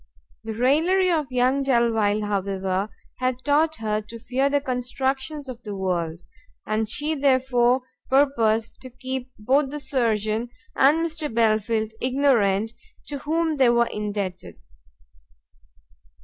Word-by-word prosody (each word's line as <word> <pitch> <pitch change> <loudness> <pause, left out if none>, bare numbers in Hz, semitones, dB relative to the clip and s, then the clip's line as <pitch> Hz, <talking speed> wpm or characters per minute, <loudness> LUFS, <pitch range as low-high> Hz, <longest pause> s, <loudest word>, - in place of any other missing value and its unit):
The 220 -1 -5
raillery 330 - +3
of 305 -6 -1
young 255 +2 +2
Delvile, 230 -5 +2
however, 195 -1 -1 0.3
had 255 -1 0
taught 305 +2 +2
her 215 -3 -2
to 215 +2 -10
fear 260 +4 0
the 285 0 +2
constructions 265 +2 -3
of 250 -2 -8
the 205 -3 -6
world, 175 -3 -2 0.4
and 215 0 -1
she 295 +6 -1
therefore 260 -3 +2 0.3
purposed 230 -5 +2
to 255 - -9
keep 260 0 -5
both 265 +6 +2
the 295 +2 -5
surgeon 230 -4 0 0.3
and 305 +5 +4
Mr 315 -3 -3
Belfield 220 -1 +1
ignorant 235 -6 +2 0.4
to 285 -2 -4
whom 320 +1 0
they 260 -3 +5
were 235 0 +4
indebted. 200 - -4
250 Hz, 125 wpm, -24 LUFS, 215-275 Hz, 0.4 s, they